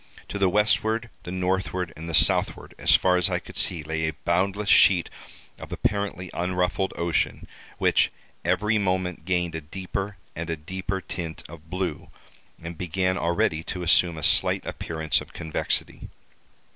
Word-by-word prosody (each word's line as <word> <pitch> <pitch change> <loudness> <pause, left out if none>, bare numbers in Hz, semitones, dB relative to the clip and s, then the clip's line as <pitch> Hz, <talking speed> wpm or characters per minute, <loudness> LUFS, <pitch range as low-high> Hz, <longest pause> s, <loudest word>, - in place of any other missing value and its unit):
To 100 - -4
the 95 -1 +4
westward, 110 +3 +1
the 90 - -7
northward, 90 -1 -1
and 80 +2 -7
the 80 - 0
southward, - - +3
as - - +5
far 90 -1 +3
as 90 - +2
I - - +1
could - - -10
see, 85 -4 +3
lay 80 +1 -2
a 80 - -3
boundless 95 +4 +1
sheet 90 -3 +5 0.5
of - - -10
apparently 100 -3 -2
unruffled 90 +2 0
ocean, 85 -1 -1 0.3
which - - +3 0.3
every 105 +1 +2
moment 90 -4 -1
gained 90 -2 0
a 80 - -4
deeper 95 +4 -5 0.2
and 85 +1 -5
a 80 - -2
deeper 95 +4 -4
tint 85 -4 -6
of 80 0 -13
blue 90 -4 -3 0.5
and 85 -1 -8
began 90 +1 0
already 85 -2 +1
to 90 -2 -4
assume 85 0 +3
a 80 - -7
slight - - +4
appearance 80 -3 -1
of - - -12
convexity. 80 -2 -3
90 Hz, 160 wpm, -25 LUFS, 85-95 Hz, 0.5 s, as